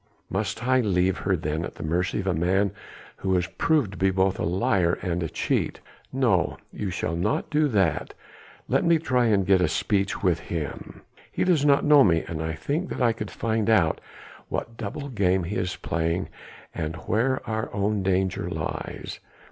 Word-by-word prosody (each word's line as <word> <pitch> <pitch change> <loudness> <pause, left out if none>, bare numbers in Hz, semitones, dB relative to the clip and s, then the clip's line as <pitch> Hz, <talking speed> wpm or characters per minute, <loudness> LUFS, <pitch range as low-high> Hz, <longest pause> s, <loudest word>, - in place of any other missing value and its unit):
"Must 105 +4 -2
I 130 0 +4
leave 95 -5 +1
her 95 0 +1
then 80 0 -2
at - - -6
the - - -7
mercy 90 +6 0
of - - -8
a 95 - +1
man 95 +4 +1 0.5
who 95 -1 +1
is 90 - +1
proved 135 - +1
to 95 - -9
be 95 - +3
both 95 0 +1
a - - -1
liar 90 -1 +1
and 90 -2 -1
a 80 - -2
cheat?" - - -1 0.3
"No! - - +1 0.2
you 100 - -3
shall 85 -2 -2
not 140 - -1
do 150 0 +3
that. 95 - 0 0.5
Let - - +2
me 170 -1 +4
try 125 -6 +1
and 100 -4 +3
get 95 -1 +4
speech 100 +3 0
with 90 -4 +2
him. 80 -5 -6 0.3
He - - 0
does 170 -6 +3
not 140 -1 +4
know 145 -2 +7
me; 85 -6 +3
and 80 -1 -4
I 80 0 -2
think 150 - -2
that - - -4
I 115 -1 +4
could 105 -2 -6
find 110 -1 -1
out 95 -8 +3 0.5
what 115 - -4
double 115 +6 -5
game 95 -7 +1
he 95 +5 -4
is 90 -1 -1
playing 85 +3 -2 0.4
and 80 +1 -3
where 115 +10 -1
our 110 0 -2
own 100 0 0
danger 95 0 0
lies. - - -5
95 Hz, 190 wpm, -25 LUFS, 90-115 Hz, 0.5 s, know